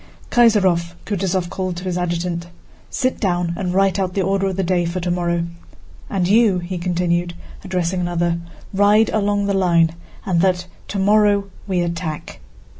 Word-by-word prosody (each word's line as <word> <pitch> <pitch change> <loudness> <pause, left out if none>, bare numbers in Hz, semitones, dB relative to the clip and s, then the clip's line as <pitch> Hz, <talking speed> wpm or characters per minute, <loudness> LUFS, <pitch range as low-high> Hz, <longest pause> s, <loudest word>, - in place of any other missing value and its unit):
"Kaysárov!" 190 -8 +3
Kutúzov 190 -3 -1
called 185 -2 -3
to 180 - -6
his 185 -2 -2
adjutant. 175 -1 -2 0.4
"Sit 255 -1 -1
down 175 -4 0
and 180 -1 -2
write 195 0 +2
out 185 -2 -1
the 195 - +1
order 195 +1 +1
of 190 - -2
the 195 - 0
day 175 0 +1
for 170 +2 -2
tomorrow. 175 -1 0 0.6
And 185 -3 0
you," 210 -1 +4
he 180 +1 -4
continued, 175 0 0 0.3
addressing 180 -1 -1
another, 175 -1 0 0.3
"ride 205 +3 +4
along 205 -1 +1
the 200 - 0
line 170 -4 +3 0.3
and 180 -5 +1
announce 180 -1 +2
that - - -21 0.2
tomorrow 205 0 +2 0.2
we 185 -3 +1
attack." 170 -3 -4
180 Hz, 160 wpm, -20 LUFS, 175-195 Hz, 0.6 s, you